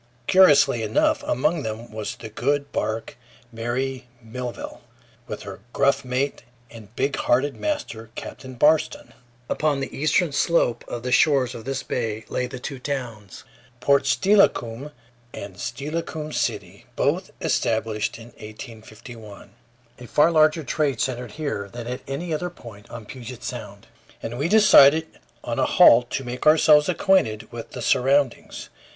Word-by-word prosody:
Curiously 145 -10 +5
enough, 110 -1 +1
among 150 +6 +1
them 110 0 -6
was 110 -1 -5
the 110 - -9
good 140 +6 -1
bark 110 +1 -3 0.3
Mary 125 +3 -3
Melville, 120 +1 -7 0.5
with - - -6
her - - -9
gruff 140 0 +2
mate 130 +2 -2 0.3
and 115 -1 -13
big 135 +1 -1
hearted 135 +4 +1
master, 290 - -4
Captain 130 -1 -8
Barston. 160 - +2 0.3
Upon 150 -3 0
the 135 - -5
eastern 155 +3 +1
slope 140 -4 +1
of 120 - -6
the 125 - -3
shores 130 -2 +3
of 115 - -9
this 135 0 -3
bay 110 -2 -3
lay 125 - -2
the - - -8
two 130 +1 -7
towns, 120 -8 -6 0.4
Port 140 +2 +3
Steilacoom, 135 - +2 0.5
and 100 -2 -8
Steilacoom 150 +4 -5
City, - - -3
both - - 0
established 110 -1 -1
in 115 0 -12
1851. 110 -1 -11 0.5
A 125 - -10
far 150 +7 +4
larger 155 0 +3
trade 140 -2 -1
centered 125 -4 -3
here 140 -10 -4
than 120 -1 -7
at 125 +1 -5
any 160 +5 -4
other 180 +3 -2
point 115 -11 -14
on 120 -2 -9
Puget 125 +1 -9
Sound, - - -7 0.4
and 120 +2 -5
we 150 +4 0
decided 160 -8 +6 0.2
on - - -3
a - - +3
halt 120 +1 +6
to 135 - -3
make 125 +4 -4
ourselves 155 -1 +6
acquainted 115 - +1
with 115 -1 -9
the - - -6
surroundings. 135 0 +1
130 Hz, 145 wpm, -23 LUFS, 115-150 Hz, 0.5 s, decided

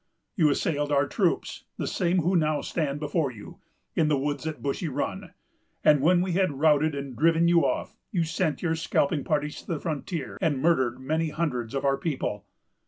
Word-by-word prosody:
You 160 -8 +4
assailed 145 0 0
our 140 0 +3
troops——the - - -2
same 180 0 +1
who 180 +4 +2
now 155 -3 +2
stand 150 -4 -2
before 150 0 0
you——in 125 +7 -5
the 150 -2 +2
woods 145 +1 -2
at 155 - -5
Bushy 145 +5 -2
Run; 140 - -4 0.5
and, 150 -2 +5
when 175 +4 +4
we 185 - -2
had 185 -3 +1
routed 155 0 +3
and 140 -2 -5
driven 165 +4 +3
you 170 -1 +5
off, - - -1 0.2
you 175 -6 +1
sent 155 0 -1
your 165 -2 +1
scalping 155 -3 0
parties 150 -1 -1
to - - -23
the 165 -5 -2
frontier, 155 -1 -4
and 155 -7 +1
murdered 130 -6 +2
many 155 +4 -1
hundreds 140 -7 -2
of 135 - -1
our 135 0 +3
people. 130 - -3
150 Hz, 180 wpm, -27 LUFS, 140-165 Hz, 0.5 s, and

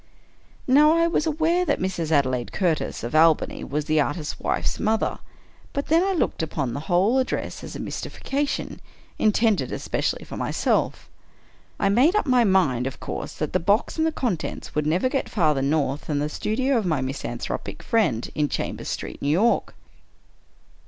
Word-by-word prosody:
Now, 295 +4 +6
I 335 - +4
was 335 -2 +1
aware 320 +3 +2
that 295 -5 0
Mrs. 180 -4 -2
Adelaide 130 -5 +1
Curtis, 175 -6 -1
of 120 - -4
Albany, 160 0 +3
was 150 +1 -2
the 155 0 +3
artist's 150 +2 -3
wife's - - -1
mother; 220 +1 0 0.3
— - - -29
but 280 - -3
then 330 +3 +4
I 390 0 +1
looked 340 - 0
upon 140 -6 -2
the 140 - -3
whole 195 +9 +3
address 260 - -3
as - - -8
a - - -6
mystification, 285 +1 -3 0.4
intended 215 0 +2
especially - - -2
for - - -8
myself. - - 0 0.7
I 200 - +2
made 260 - +4
up 425 - +2
my 255 -3 +4
mind, 150 - +2
of 135 - -7
course, - - -5
that - - -4
the - - +3
box 205 - +1
and 320 0 +1
contents 215 -11 -3
would 150 0 0
never 175 +10 +2
get 270 +1 -2
farther 155 -9 +2
north 140 0 0
than 150 - -1
the 145 +1 -1
studio 250 - 0
of 215 - -3
my 155 -5 +1
misanthropic 130 +2 -4
friend, 200 - +1
in 150 -1 0
Chambers - - -4
Street, - - -5
New 140 - 0
York. 200 +10 +2
190 Hz, 170 wpm, -24 LUFS, -, 0.7 s, Now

